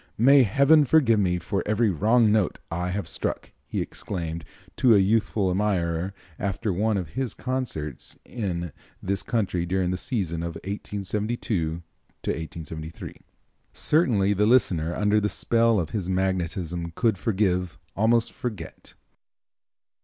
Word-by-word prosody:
"May 135 +5 +7
Heaven 140 +7 +5
forgive 130 -6 +4
me 90 -3 +1
for 95 +3 -2
every 105 0 +2
wrong 110 +6 +3
note 105 -4 +1
I 90 +2 -2
have 95 -1 -3
struck!" - - -4 0.2
he - - -2
exclaimed 85 -3 -5 0.3
to 120 -4 +5
a - - +6
youthful 100 -1 +2
admirer 90 -2 0 0.2
after 100 +1 -1
one 105 +3 +1
of 90 -5 -4
his 130 0 -3
concerts 125 - -4
in 85 -8 -3 0.3
this 100 +1 -2
country 100 -7 -1
during 90 +1 0
the 90 - -1
season 90 -10 -2
of 85 0 -4
1872 100 -4 -2 0.4
3. 80 0 -6 0.5
Certainly 110 - +2
the 105 +1 +2
listener 90 -9 +2
under 105 0 +3
the 105 - +1
spell 115 -1 +2
of 80 -4 -3
his 95 -4 -3
magnetism 90 -2 -2
could 110 -6 +1
forgive, 90 -6 0 0.2
almost 115 +2 +2
forget. 105 -10 -7
100 Hz, 130 wpm, -25 LUFS, 85-110 Hz, 0.5 s, May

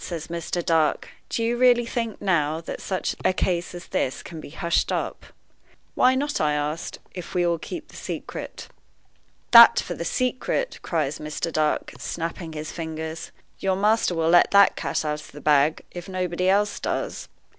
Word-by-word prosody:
says 170 -3 -6
Mr. 170 +1 -3
Dark, 160 -2 +1 0.2
"do 230 - -1
you 235 +1 +1
really 245 -1 +5
think, 230 -2 -3
now, 160 -6 +1
that 165 - -7
such 185 -1 -2
a - - +4
case 175 -1 -1
as 175 - -8
this 130 - -2
can 160 -2 -8
be - - -10
hushed 170 +3 0
up?" - - -3 0.7
"Why 255 +1 +4
not," 290 +2 -1
I 150 -1 +2
asked, 150 +2 -3 0.2
"if 180 0 -8
we 175 -1 +2
all 170 -1 +1
keep 320 - -7
the - - -15
secret?" - - -6 0.8
"That 235 0 +10
for 175 - -4
the 170 - -5
secret!" 255 - -1
cries 155 -4 -1
Mr. 155 +2 -4
Dark, 155 -1 0
snapping 165 0 -5
his 155 0 -5
fingers. 160 -1 -6 0.3
"Your 190 -1 +1
master 210 -2 +2
will 165 0 +1
let 175 +1 +6
the 200 0 +7
cat 160 - -2
out 150 0 -2
of - - -14
the 145 - -9
bag, 150 +1 +3
if 175 +1 -8
nobody 185 0 -1
else 205 +2 +2
does." - - -3
175 Hz, 175 wpm, -24 LUFS, 160-200 Hz, 0.8 s, That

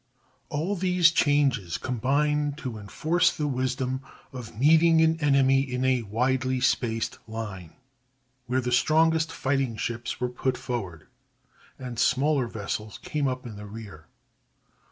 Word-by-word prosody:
All 160 +7 -1
these 180 -2 +3
changes 135 - +2
combined 145 - 0
to 125 -7 -6
enforce 165 - +1
the 150 - -3
wisdom 130 -1 -1 0.3
of 115 -4 -9
meeting 160 +3 +5
an 160 0 +3
enemy 135 -3 +4
in 130 -1 -2
a 130 -2 +2
widely 130 +4 0
spaced 115 -3 0
line, 105 -7 -7 0.7
where 130 +2 +1
the 125 0 -3
strongest 160 +5 +3
fighting 135 -4 -1
ships 120 +2 -4
were 125 - 0
put 130 +1 -2
forward, 95 -10 -5 0.7
and 125 -3 -6
smaller 135 -1 +2
vessels 105 -1 -5
came 150 -2 -1
up 130 0 -3
in 110 -4 -8
the 105 0 -9
rear. 100 -7 -10
130 Hz, 135 wpm, -26 LUFS, 115-150 Hz, 0.7 s, meeting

